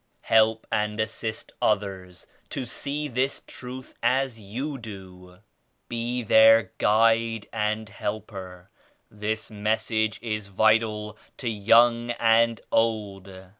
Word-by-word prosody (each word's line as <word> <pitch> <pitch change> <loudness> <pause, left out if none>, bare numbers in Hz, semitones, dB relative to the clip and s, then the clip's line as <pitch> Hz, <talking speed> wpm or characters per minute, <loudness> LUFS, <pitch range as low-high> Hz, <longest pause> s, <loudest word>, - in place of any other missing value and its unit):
Help 110 0 +3
and 105 0 -1
assist 110 0 -4
others 95 -3 -1 0.2
to 130 - -4
see 145 +5 -4
this 130 +1 -1
Truth 130 +1 -9
as 130 -3 +1
you 130 +8 -5
do. 95 -4 -11 0.5
Be 120 +1 -2
their 110 -2 +6
guide 115 0 +2
and 110 0 -1
helper. 100 -3 -7 0.4
This 105 +1 -4
Message 110 +1 -1
is 105 -3 -3
vital 105 +1 +1 0.2
to 125 - -5
young 115 +2 +4
and 115 0 +3
old. 105 -4 0
110 Hz, 105 wpm, -25 LUFS, 105-115 Hz, 0.5 s, their